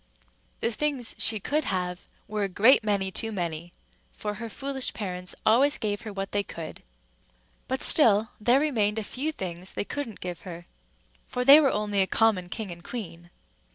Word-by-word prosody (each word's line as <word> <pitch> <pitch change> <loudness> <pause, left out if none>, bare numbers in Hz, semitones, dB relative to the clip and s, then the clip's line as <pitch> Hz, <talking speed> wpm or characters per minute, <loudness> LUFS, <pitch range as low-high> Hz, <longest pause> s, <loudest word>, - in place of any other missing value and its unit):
The 230 - +1
things 270 -1 +1
she 220 -2 +1
could 300 +9 0
have 180 -1 -3 0.2
were 210 0 -3
a 200 - -1
great 225 +7 +5
many 200 -3 0
too 225 +4 -1
many, 170 -3 -4 0.4
for 210 -1 -4
her 230 - -5
foolish 270 +3 -2
parents 180 -3 -4
always 270 +7 +5
gave 205 -1 -2
her 220 - -7
what 195 -1 -5
they 205 - +1
could; 165 -5 -8 0.9
but 260 +1 -2
still 220 -7 +4
there 245 +5 +4
remained 225 -8 +1
a 220 - -1
few 275 +9 -3
things 185 - -6
they - - -2
couldn't 275 -6 -5
give 180 -1 -6
her, 175 -2 -9 0.6
for 250 0 -2
they 280 +3 +10
were 285 -3 +4
only 205 -3 0
a 190 - +2
common 200 -6 +2
king 215 -1 -5
and 170 0 -10
queen. 175 -8 -7
210 Hz, 180 wpm, -27 LUFS, 185-245 Hz, 0.9 s, they